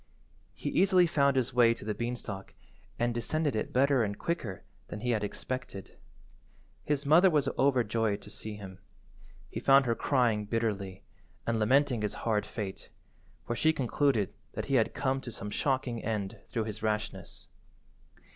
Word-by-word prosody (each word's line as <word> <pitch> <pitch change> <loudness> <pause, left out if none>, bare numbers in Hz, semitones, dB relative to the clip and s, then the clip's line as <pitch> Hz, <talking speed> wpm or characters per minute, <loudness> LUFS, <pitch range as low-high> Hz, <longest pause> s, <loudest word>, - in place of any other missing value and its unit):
He - - -4
easily 185 -2 +5
found 140 -4 +2
his 130 -1 0
way 120 -1 +5
to - - -10
the 105 - -1
beanstalk 110 -3 -5 0.4
and 120 0 +1
descended 145 +4 -1
it 110 - -2
better 135 -1 +3
and 100 -1 -3
quicker 115 - -3 0.2
than 105 - -7
he 125 +1 0
had 110 -3 0
expected. 125 -1 -5 0.9
His 145 -1 -1
mother 170 +6 +6
was 150 -5 +2
overjoyed 115 -6 +1
to 105 - -11
see 110 -1 -6
him. 95 -2 -10 0.7
He - - -3
found 135 0 +5
her 115 - +2
crying 115 -5 +1
bitterly, 100 -4 -2 0.4
and 115 -1 0
lamenting 130 +2 +3
his 105 - -2
hard 110 -2 +1
fate, 100 -4 -6 0.6
for 120 - -2
she 160 +6 +3
concluded 130 - +1 0.3
he 140 - -3
had 115 -4 +2
come 135 -1 0
to 120 - -7
some 105 -1 -6
shocking 130 -2 -1
end 105 -4 -3
through 115 - -1
his 110 -1 -6
rashness. 110 -1 -3
120 Hz, 155 wpm, -30 LUFS, 105-135 Hz, 0.9 s, mother